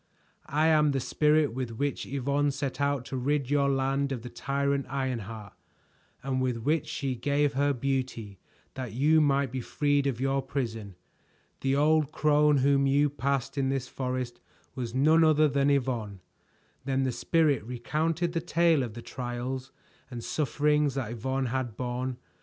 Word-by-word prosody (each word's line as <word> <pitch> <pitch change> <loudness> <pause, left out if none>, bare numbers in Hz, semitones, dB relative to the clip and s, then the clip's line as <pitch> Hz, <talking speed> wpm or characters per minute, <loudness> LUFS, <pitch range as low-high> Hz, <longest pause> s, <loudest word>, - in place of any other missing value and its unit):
"I 150 +3 +2
am 150 -2 +4
the 135 - 0
Spirit 150 +1 +2
with 120 -3 -4
which 140 +1 -2
Yvonne 140 +2 0
set 140 -1 -3
out 140 -3 0
to 135 - -4
rid 140 +1 -1
your 140 -1 +3
land 135 +1 0
of 125 -4 -4
the 125 - -8
tyrant 140 0 -1
Ironheart, 115 -6 -4 0.7
and 130 -1 -1
with 125 -2 0
which 150 +7 0
she 135 -2 -2
gave 145 +3 0
her 140 +2 +2
beauty 125 -6 -3 0.3
that 130 -4 -6
you 155 +6 +4
might 140 -3 +2
be 130 0 -3
freed 145 +2 +1
of 125 -4 -2
your 135 +1 +1
prison. 115 -7 -4 0.6
The 135 0 +1
old 155 0 +3
crone 150 -1 +3
whom 140 -1 +3
you 145 +1 +3
passed 140 0 -2
in 135 -1 +1
this 135 -2 -2
forest 125 -2 -4 0.3
was 120 -2 -5
none 155 +5 +5
other 155 -1 +5
than 140 0 +1
Yvonne." 120 -8 -1 0.6
Then 135 0 0
the 130 - 0
Spirit 150 -1 +1
recounted 155 +8 -1
the 165 - -1
tale 170 -2 +3
of 115 -4 -4
the 120 - -8
trials 125 +1 -5 0.4
and 120 -3 -7
sufferings 150 -1 +1
that 125 -5 -3
Yvonne 130 +3 -2
had 125 -3 -3
borne. 125 0 -3
135 Hz, 165 wpm, -28 LUFS, 125-145 Hz, 0.7 s, none